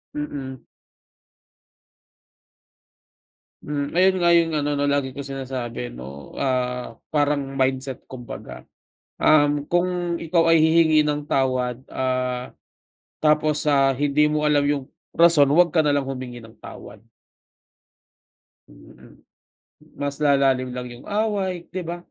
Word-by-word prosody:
Mm. 140 -3 -6 3.0
Mm, 145 0 -4
ayun 185 +1 +4
nga 175 -1 +3
yung 165 -1 +3
ano 145 0 -1
na 145 0 0
lagi 140 -2 -1
kong 140 - -5
sinasabi 125 -3 -5
no, 65 +2 -10
ah 125 -2 -2
parang 145 -2 0
mindset 130 0 -1
kung 125 -2 -11
baga, - - -9 0.5
um, 145 -1 +3
kung 175 0 -1
ikaw 165 0 +2
ay 165 - +5
hihingi 160 -1 +4
ng 150 -1 -1
tawad, 130 -4 0
ah, 130 -1 -2 0.7
tapos 150 0 +2
ah, 135 -3 +3
hindi 145 +2 +2
mo 150 0 -1
alam 150 -1 +3
yung 145 -2 -1 0.3
rason 165 -4 +5
'wag 170 +4 +4
ka 160 - +3
na 150 -2 +2
lang 140 - 0
humingi 125 -3 -6
ng 115 0 -16
tawad. 105 - -11 1.7
Mm. - - -18 0.8
Mas 140 0 -2
lalalim 135 -3 +3
lang 125 0 -5
yung 120 - -13
away, 200 -4 -2
'di 185 0 -4
ba 170 +1 -4
145 Hz, 125 wpm, -23 LUFS, 130-155 Hz, 3.0 s, ay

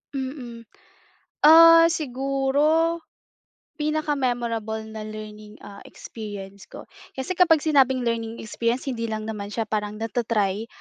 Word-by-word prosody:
Mm. 260 -4 -6 0.8
Ah, 330 +1 +8
siguro, 290 +3 0 0.8
pinaka-memorable 245 -8 -2
na 215 - -6
learning, 215 0 -10
ah, 200 -1 -11
experience 200 -3 -9
ko, - - -11 0.3
kasi 265 +8 -3
kapag 340 -3 +4
sinabing 265 -5 +3
learning 230 -1 -2
experience 235 +4 -2
hindi 230 -4 -3
lang 215 0 -4
naman 210 -2 -6
siya 225 +1 -3
parang 210 -1 -3
nata-try, 225 -2 -1
235 Hz, 110 wpm, -24 LUFS, 215-285 Hz, 0.8 s, Ah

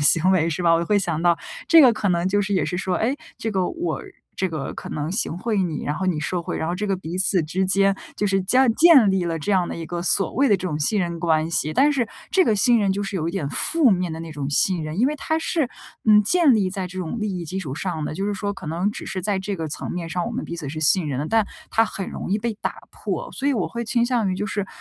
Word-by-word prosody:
行 165 +5 +4
为 170 -3 +3
是 165 +2 -2
吧， 170 - +4
我 170 - +1
会 205 +4 +2
想 170 -5 -2
到 170 -1 +3 0.3
这 330 -1 +7
个 255 -4 +7
可 210 -2 -1
能 175 0 +1
就 205 +2 +2
是 200 0 -1
也 180 -6 +1
是 180 +3 -3
说， 185 -1 -1
哎， 250 +9 0 0.2
这 225 - -2
个， 190 -3 0
我 340 +1 -3 0.3
这 190 - -1
个 155 -4 -4
可 - - -8
能 155 +3 -3
行 195 -5 -1
贿 210 0 0
你， 165 -4 -3
然 145 - -1
后 190 +4 -3
你 170 -4 0
受 170 +3 -2
贿， - - -4
然 - - -2
后 175 - -1
这 210 +3 -3
个 195 - 0
彼 180 0 -6
此 185 -2 +2
之 185 +5 -1
间 195 +1 +3 0.2
就 210 - 0
是 195 -1 +1
建 250 +5 +4
建 295 - +7
立 190 -2 0
了 165 -1 -2
这 160 +7 -1
样 185 -3 +2
的 - - -5
一 165 - -5
个 170 +2 -4
所 185 +2 +2
谓 270 +3 +2
的 205 - +4
这 185 - -5
种 155 -4 -2
信 205 +8 +1
任 170 -2 -2
关 160 -1 +1
系。 155 -2 0
但 290 +2 +4
是 245 -5 0 0.2
这 380 - +4
个 220 -10 +2
信 235 +2 +4
任 200 - +1
就 200 +2 -1
是 200 0 -5
有 165 -3 -1
一 - - -1
点 175 -6 -3
负 320 - +2
面 180 -3 0
的 160 - -5
那 165 -1 -7
种 145 -2 -4
信 175 +4 +1
任， 155 +4 -5
因 250 - +4
为 300 - 0
它 315 +2 -1
是， 320 -4 0 0.4
嗯， 210 -1 +7
建 300 - +4
立 195 -4 +1
在 190 -1 -4
这 185 +1 -8
种 185 +6 -4
利 205 -3 -2
益 175 - -5
基 180 +4 -4
础 145 -8 -5
上 160 -2 -3
的， - - -5
就 195 +4 -3
是 205 - -1
说 205 0 -3
可 185 - -10
能 170 +6 -1
只 - - -7
是 190 - -4
在 200 +1 -1
这 195 +1 -3
个 160 -4 -4
层 - - -5
面 175 -2 -4
上， 175 +3 -2
我 235 - -4
们 255 +3 -3
彼 170 - -6
此 155 - -6
是 155 +2 -5
信 160 +2 +3
任 135 -2 -2
的， 150 - -3
但 225 -2 +2 0.2
它 225 - +3
很 195 -3 -5
容 - - -6
易 205 - +2
被 230 +1 -2
打 - - -1 0.2
破。 - - -5
所 275 - -3
以 285 - +3
我 215 -9 -1
会 235 0 -4
倾 235 +1 +1
向 240 -4 +1
于 - - -1
就 205 - -3
是 205 -2 -3
190 Hz, 320 characters per minute, -23 LUFS, 170-215 Hz, 0.4 s, 这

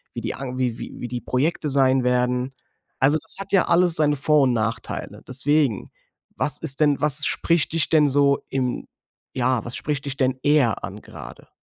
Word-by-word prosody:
wie - - -4
die - - -3
an 130 -1 -6
wie 125 -3 -1
wie 120 - -7
die 120 0 -4
Projekte 150 +4 -1
sein 135 -2 +3
werden. 125 +1 0 0.5
Also, 145 +3 +3
das - - -7
hat 195 0 -7
ja 190 - +4
alles 175 0 +3
seine 150 -2 +3
Vor 150 +2 +3
und 130 -2 +2
Nachteile. 115 0 -4
Deswegen. 140 -3 0 0.4
Was 150 - -1
ist 140 -4 -4
denn 145 -2 +3
was 150 0 +2
spricht 170 -2 0
dich 165 -2 +1
denn 150 -3 +4
so 140 0 +3
im 130 -2 -2 0.5
ja, 125 -2 +1
was 120 - -5
spricht 145 -1 -3
dich 140 -1 -5
denn 130 -2 0
eher 145 -7 +2
an, - - -7
gerade? - - -12
135 Hz, 185 wpm, -23 LUFS, 125-150 Hz, 0.5 s, ja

